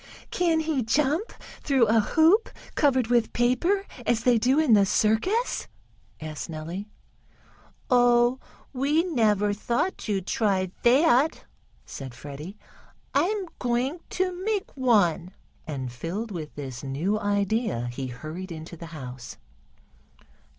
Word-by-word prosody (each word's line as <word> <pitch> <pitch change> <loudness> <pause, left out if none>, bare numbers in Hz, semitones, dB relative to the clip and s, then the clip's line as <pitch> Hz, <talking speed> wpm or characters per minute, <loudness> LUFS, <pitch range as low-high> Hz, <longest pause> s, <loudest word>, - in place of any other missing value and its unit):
"Can 335 -3 +2
he 310 -4 0
jump 295 - +1 0.3
through 270 -5 +3
a 225 +1 +4
hoop, 325 - +4 0.2
covered 260 -5 +3
with 240 0 +1
paper 295 +12 +1 0.2
as 230 0 +1
they 245 -1 +4
do 255 +5 +2
in 310 -7 +4
the 205 -2 +6
circus?" 220 - +1 0.5
asked 155 0 -6
Nellie. 165 +6 -6 1.0
"Oh, 245 0 +4 0.3
we 285 +5 +2
never 210 - +2
thought 235 - -1
to 205 -3 -1
try 190 -1 0
that," 270 +3 +3 0.4
said 130 -3 -8
Freddie. 145 - -9 0.6
"I'm 380 +7 +1
going 250 +6 -1
to 365 0 -2
make 430 +2 -2
one," 200 - +2 0.3
and, 130 -5 -4
filled 180 - -5
with 160 -5 -6
this 130 -4 -6
new 160 +11 -1
idea, 205 - 0
he 130 +1 -4
hurried 155 +9 -7
into 160 +1 -8
the 170 0 -9
house. 125 -2 -8
225 Hz, 120 wpm, -26 LUFS, 170-280 Hz, 1.0 s, the